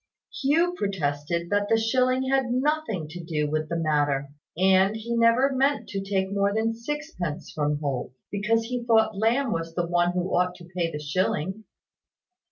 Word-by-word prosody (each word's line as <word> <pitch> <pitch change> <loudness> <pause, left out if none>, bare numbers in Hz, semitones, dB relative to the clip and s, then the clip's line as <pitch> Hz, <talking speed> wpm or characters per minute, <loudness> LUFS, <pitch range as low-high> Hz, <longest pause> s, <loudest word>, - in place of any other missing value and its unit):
Hugh 330 +6 +3
protested 170 - -2
that 205 0 +1
the 225 - +4
shilling 255 +3 +1
had 265 -2 +1
nothing 255 - 0
to 175 +2 -8
do 155 -3 -1
with 155 +1 -2
the 170 - -2
matter; 145 -3 +1 0.3
and 190 +2 +4
he 230 +2 -3
never 235 +4 +4
meant 275 +2 +1
to 195 - -3
take 195 0 -1
more 200 0 +2
than 220 +2 0
sixpence 230 - -5
from 150 -1 0
Holt, 140 -5 -3 0.2
because 215 +3 +1
he 245 +1 -3
thought 220 -2 +3
Lamb 230 +5 +1
was 165 -2 -3
the 175 - 0
one 175 +1 +1
who 180 0 -1
ought 180 0 +1
to 175 - -13
pay 170 -2 0
the 150 - -4
shilling. 185 +6 -2
195 Hz, 175 wpm, -26 LUFS, 165-235 Hz, 0.3 s, the